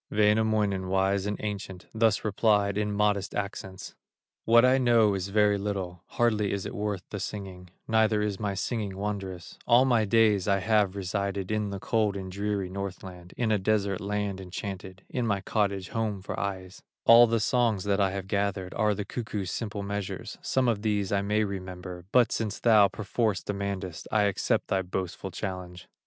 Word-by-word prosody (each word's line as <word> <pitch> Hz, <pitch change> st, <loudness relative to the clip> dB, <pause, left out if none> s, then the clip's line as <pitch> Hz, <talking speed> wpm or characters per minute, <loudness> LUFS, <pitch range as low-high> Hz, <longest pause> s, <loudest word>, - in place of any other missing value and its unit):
Wainamoinen, 105 Hz, -2 st, +2 dB
wise 95 Hz, +1 st, +1 dB
and 105 Hz, -, -3 dB
ancient, 100 Hz, -3 st, -5 dB
Thus 110 Hz, -1 st, +2 dB
replied 105 Hz, -1 st, +2 dB
in 105 Hz, 0 st, 0 dB
modest 100 Hz, -1 st, 0 dB
accents: 95 Hz, -2 st, -5 dB, 0.5 s
"What 115 Hz, +2 st, +6 dB
I 130 Hz, +1 st, +4 dB
know 115 Hz, -4 st, +4 dB
is 95 Hz, -1 st, -2 dB
very 105 Hz, 0 st, +3 dB
little, 95 Hz, -4 st, -4 dB
Hardly 110 Hz, -4 st, +1 dB
is 100 Hz, -1 st, -2 dB
it -, -, -5 dB
worth 105 Hz, -2 st, -3 dB
the 100 Hz, -, -4 dB
singing, 95 Hz, -3 st, -6 dB, 0.2 s
Neither 110 Hz, -1 st, +3 dB
is 105 Hz, -2 st, -2 dB
my 100 Hz, -2 st, -2 dB
singing 100 Hz, -1 st, -3 dB
wondrous: 95 Hz, -4 st, -5 dB
All 125 Hz, +2 st, +6 dB
my 120 Hz, -4 st, +3 dB
days 105 Hz, -3 st, +3 dB
I 100 Hz, -1 st, +3 dB
have 100 Hz, -1 st, +2 dB
resided 100 Hz, 0 st, -2 dB
In 105 Hz, -1 st, 0 dB
the 100 Hz, -1 st, -5 dB
cold 105 Hz, -2 st, 0 dB
and 95 Hz, -1 st, -6 dB
dreary 100 Hz, 0 st, -2 dB
Northland, 95 Hz, -2 st, -7 dB
In 115 Hz, -3 st, +1 dB
a 105 Hz, -, +2 dB
desert 100 Hz, -1 st, 0 dB
land 100 Hz, -1 st, -2 dB
enchanted, 95 Hz, 0 st, -7 dB
In 125 Hz, -2 st, -2 dB
my 100 Hz, -2 st, +1 dB
cottage 100 Hz, -2 st, -1 dB
home 110 Hz, -4 st, -2 dB
for -, -, -5 dB
ages; 95 Hz, -2 st, -5 dB, 0.2 s
All 120 Hz, +1 st, +9 dB
the 115 Hz, 0 st, +1 dB
songs 115 Hz, -3 st, +1 dB
that 100 Hz, -1 st, +1 dB
I 95 Hz, -, +3 dB
have 95 Hz, 0 st, -5 dB
gathered, 100 Hz, -2 st, -1 dB
Are 105 Hz, -2 st, +1 dB
the 105 Hz, 0 st, -4 dB
cuckoo's 105 Hz, -6 st, -4 dB
simple 105 Hz, -3 st, -4 dB
measures, 100 Hz, -1 st, -5 dB
Some 130 Hz, -1 st, +1 dB
of 110 Hz, -4 st, +1 dB
these 105 Hz, -3 st, 0 dB
I 100 Hz, -1 st, +2 dB
may 105 Hz, +2 st, +1 dB
remember; 90 Hz, -3 st, -6 dB
But 125 Hz, -2 st, +4 dB
since 110 Hz, -2 st, -2 dB
thou 110 Hz, -4 st, +6 dB
perforce 105 Hz, +1 st, -1 dB
demandest, 100 Hz, -3 st, -4 dB
I 105 Hz, -1 st, +3 dB
accept 100 Hz, -2 st, 0 dB
thy 95 Hz, -, +2 dB
boastful 95 Hz, +1 st, -4 dB
challenge. 90 Hz, -2 st, -6 dB
100 Hz, 175 wpm, -28 LUFS, 95-110 Hz, 0.5 s, All